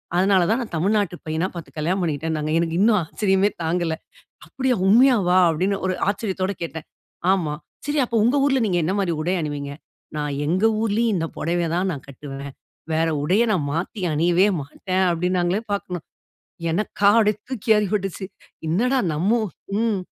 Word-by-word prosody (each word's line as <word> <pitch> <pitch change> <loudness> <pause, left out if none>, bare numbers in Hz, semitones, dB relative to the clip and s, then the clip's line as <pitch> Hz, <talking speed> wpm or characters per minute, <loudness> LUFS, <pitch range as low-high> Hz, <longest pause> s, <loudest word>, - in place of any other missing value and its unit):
அதனால 190 +1 +4
தான், 225 +3 +2
நான் 235 - -7
தமிழ்நாட்டு 200 +1 +1
பையனா 160 +3 -1
பார்த்து 170 -3 -8
கல்யாணம் 175 +5 0
பண்ணிக்கிட்டேன்னாங்க. 155 -1 -2
எனக்கு 165 -1 -1
இன்னும் 210 +1 +4
ஆச்சரியமே 195 +4 +1
தாங்கல. 165 0 0 0.5
"அப்டியா? 260 -1 0
உண்மையாவா?" 215 -5 +5
அப்டின்னு 185 +5 0
ஒரு 185 - 0 0.2
ஆச்சரியத்தோடு 195 -2 -3
கேட்டேன். 160 -1 -6 0.5
ஆமா. 165 -6 0 0.3
"சரி, 295 0 +1
அப்போ 235 -1 -1
உங்க 245 +6 +3
ஊர்ல 270 -2 +2
நீங்க 180 -3 +1
என்ன 185 +4 0
மாரி 185 -4 0
உடை 180 +4 0
அணிவீங்க?" 145 -2 -4 0.5
"நான் 150 -1 -2
எங்க 185 +7 +2 0.2
ஊரிலயும் 225 +1 +1
இந்த 165 -1 -1
புடவய 170 0 0
தான் 185 +2 0
நான் 140 - -8
கட்டுவேன். 140 0 -8 0.4
வேற 160 +1 +2 0.2
உடைய 190 +9 +3
நான் 155 -7 0
மாத்தி 180 +6 -3
அணியவே 175 +5 +3 0.2
மாட்டேன்." 185 +6 -1
அப்டின்னாங்களே 180 +3 0
பார்க்கணும். 180 -4 -4 0.7
எனக்கா, 200 +2 +2
அப்டி 210 -1 +4 0.2
தூக்கிவாரி 220 -4 +2
போட்டுச்சு. 195 -2 -2 0.4
என்னடா? 240 +12 +2
நம்ம 160 +6 0 0.5
ம். 225 -3 +1
185 Hz, 150 wpm, -22 LUFS, 160-210 Hz, 0.7 s, உண்மையாவா